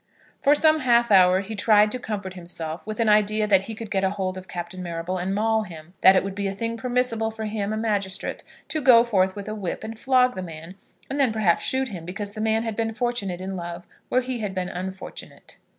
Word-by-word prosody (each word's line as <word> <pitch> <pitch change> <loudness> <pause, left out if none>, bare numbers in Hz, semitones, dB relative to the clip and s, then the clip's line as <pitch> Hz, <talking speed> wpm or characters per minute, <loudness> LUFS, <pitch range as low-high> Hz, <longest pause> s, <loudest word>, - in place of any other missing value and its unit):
For 285 +1 +5
some 310 +1 +4
half 240 -4 +3
hour 185 -1 +6
he 200 +3 -7
tried 210 0 +4
to 255 - -2
comfort 205 -5 -5
himself 170 -1 -6
with 215 +1 -5
an 230 - +2
idea 215 0 +3
that 195 -2 +3
he 225 - -6
could 220 -1 -8
get 195 -1 +1
hold 190 -1 -1
of 185 0 -9
Captain 175 +1 -6
Marrable 175 +1 -4
and 190 +2 -2
maul 220 +1 +2
him; 170 -4 -10
that 190 - +8
it 185 - +3
would 195 0 -4
be 200 0 -2
a 195 - -3
thing 230 +2 -3
permissible 245 -2 0
for 220 0 -6
him, 210 -1 -2
a 215 - -2
magistrate, 205 -4 -1 0.3
to 310 - -2
go 245 -3 +7
forth 190 -5 +1
with 205 0 -7
a 215 - -3
whip 200 -3 -4
and 220 0 -7
flog 255 -1 +3
the 185 - -5
man, 165 0 -8 0.3
and 275 +2 -4
then 265 -4 +3
perhaps 210 -6 +2
shoot 260 0 0
him, 180 -6 -7
because 195 +4 -5
the 215 +1 -6
man 220 +1 +1
had 225 -2 -3
been 225 0 -2
fortunate 220 -7 -2
in 190 +1 -4
love 175 0 -6 0.2
where 255 - +2
he 250 -1 -4
had 205 -3 -4
been 180 -1 -2
unfortunate. 185 +1 -8
210 Hz, 235 wpm, -24 LUFS, 185-225 Hz, 0.3 s, that